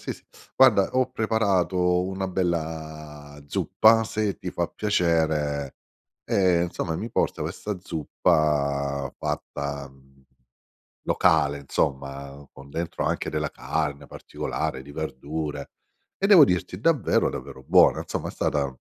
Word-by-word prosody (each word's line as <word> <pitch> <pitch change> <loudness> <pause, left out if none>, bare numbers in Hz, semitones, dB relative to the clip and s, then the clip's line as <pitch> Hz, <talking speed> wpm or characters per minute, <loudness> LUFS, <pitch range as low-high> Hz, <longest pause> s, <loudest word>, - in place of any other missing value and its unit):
sì - - -4
sì. - - -16 0.3
Guarda, 115 -7 +5
ho 130 0 +1
preparato 95 -5 +1
una 95 0 -3
bella 80 -5 -4
zuppa 115 +8 +4
se 110 -2 -2
ti - - -6
fa - - -1
piacere" 80 -8 0 0.5
ehm, 90 -3 +3
insomma 85 -1 -3
mi 115 +6 -5
porta - - 0
questa 105 -2 -4
zuppa 70 -5 0
fatta, 70 -1 -4
mhmm, 65 0 -23 0.8
locale, 70 0 +2
insomma, 70 0 -3
con 70 +1 -14
dentro 85 +3 -3
anche - - -1
della 75 -1 -2
carne 75 -2 -3
particolare 65 - -4
di 70 - -13
verdure. 75 -1 -5 0.5
E 195 - +2
devo 195 -7 +9
dirti 90 -3 -2
davvero, 150 -3 +2
davvero 65 0 -8
buona, - - +5
insomma - - -4
è - - -6
stata, 70 -3 -1
80 Hz, 125 wpm, -25 LUFS, 70-95 Hz, 0.8 s, devo